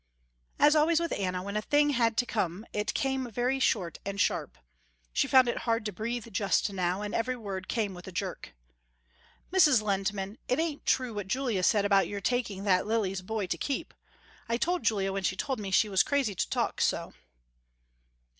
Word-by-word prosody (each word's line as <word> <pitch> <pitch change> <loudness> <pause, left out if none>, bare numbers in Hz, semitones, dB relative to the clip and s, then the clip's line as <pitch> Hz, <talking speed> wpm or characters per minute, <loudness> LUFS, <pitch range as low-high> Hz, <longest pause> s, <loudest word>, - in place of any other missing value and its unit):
As 295 +1 +5
always 310 +2 +4
with 335 0 -2
Anna 185 -2 -2
when 200 +1 -5
a 210 - +1
thing 290 +5 +3
had 230 -4 +1
to 245 - +2
come 210 -3 -2
it 210 0 -2
came 265 -2 -1
very 250 +4 0
short 185 - 0
and 200 0 -4
sharp. - - 0 0.6
She - - +2
found 260 -2 +6
it 240 - -1
hard 230 -2 -1
to 210 - -2
breathe 230 +4 -4
just 200 +1 +1
now, 185 +1 -1
and 205 - -4
every 255 +2 0
word 195 -5 -6
came 215 -4 -1
with 175 +1 -11
a - - -6
jerk. - - -5 1.0
"Mrs. 305 - +6
Lehntman, 195 0 -2
it 250 - +1
ain't 320 -2 -2
true 255 -3 +1
what 205 -2 -4
Julia 240 -3 0
said 200 +2 +3
about 195 -3 +4
your 205 - -4
taking 205 -2 -1
that 190 -1 +2
Lily's 200 -4 0
boy 215 +2 -3
to 180 - -3
keep. 285 +3 -3 0.6
I 230 - +1
told 355 +6 0
Julia 195 -3 0
when 195 - -2
she 185 0 0
told 260 +4 -2
me 200 -2 -4
she 190 +3 +4
was 195 -2 +3
crazy 275 -7 +1
to - - -2
talk - - -1
so." - - 0
215 Hz, 195 wpm, -29 LUFS, 195-255 Hz, 1.0 s, found